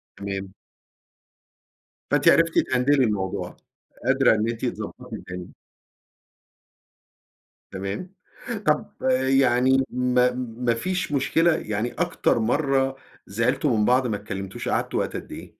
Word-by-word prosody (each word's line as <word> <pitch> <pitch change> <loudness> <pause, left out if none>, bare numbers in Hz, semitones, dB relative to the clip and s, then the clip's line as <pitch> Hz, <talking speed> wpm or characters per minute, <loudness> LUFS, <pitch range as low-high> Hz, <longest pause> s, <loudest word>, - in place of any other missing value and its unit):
تمام. 100 -1 -5 1.6
فأنتِ - - +2
عرفتِ 165 0 +4
تهندلي 130 +2 +2
الموضوع. 100 -4 -2 0.5
قادرة - - +4
إن 110 +1 0
أنتِ 115 - -3
تضبّطي - - -5
الدنيا. 90 -1 -8 2.2
تمام. 100 - -5 0.6
طب 150 0 +1 0.4
يعني 130 0 +4
ما 125 0 +2
ما 120 -1 -2
فيش 180 +6 -2
مشكلة 160 +4 +3
يعني 110 -2 -2
أكتر 175 -8 +1
مرة 135 +2 +1 0.3
زعلتوا 115 +4 +1
من 105 - +2
بعض 125 +2 +3
ما 105 - -1
اتكلمتوش، 95 -1 -5
قعدتوا - - 0
وقت - - -2
قد - - -7
إيه؟ - - -8
125 Hz, 110 wpm, -24 LUFS, 105-135 Hz, 2.2 s, عرفتِ